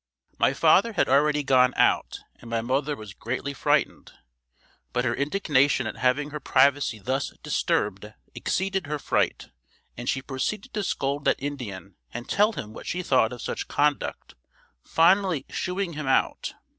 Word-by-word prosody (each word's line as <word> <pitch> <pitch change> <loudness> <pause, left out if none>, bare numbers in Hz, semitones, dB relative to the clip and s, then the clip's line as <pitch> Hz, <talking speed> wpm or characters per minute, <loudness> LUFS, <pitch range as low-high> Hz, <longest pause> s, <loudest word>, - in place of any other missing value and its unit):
My - - +3
father 230 -1 +4
had - - +2
already 150 +2 +3
gone 130 -2 +4
out - - +2 0.2
and 115 - -13
my 115 -1 0
mother 135 +5 -1
was 110 -5 -10
greatly 130 +6 -4
frightened, 135 - 0 0.8
but 125 +1 0
her - - +1
indignation 140 - +1
at 110 - -5
having 130 +5 +1
her 150 - -5
privacy 140 -3 +2
thus 130 +7 -2
disturbed - - -1 0.2
exceeded 195 -3 -2
her 150 +1 -2
fright - - -1 0.4
and 120 +1 -4
she 135 - -1
proceeded 195 - -4
to 210 - -2
scold 140 -4 -2
that - - +4
Indian 110 -10 -6
and 120 +1 -7
tell 210 +2 +3
him 110 - -7
what - - -10
she 180 +1 -2
thought 130 -7 +3
of 125 - -8
such - - -4
conduct, 145 0 -1 0.5
finally 175 -3 +3
"shooing" 180 -1 -3
him 150 -2 -5
out. 135 - 0
140 Hz, 155 wpm, -25 LUFS, 125-155 Hz, 0.8 s, father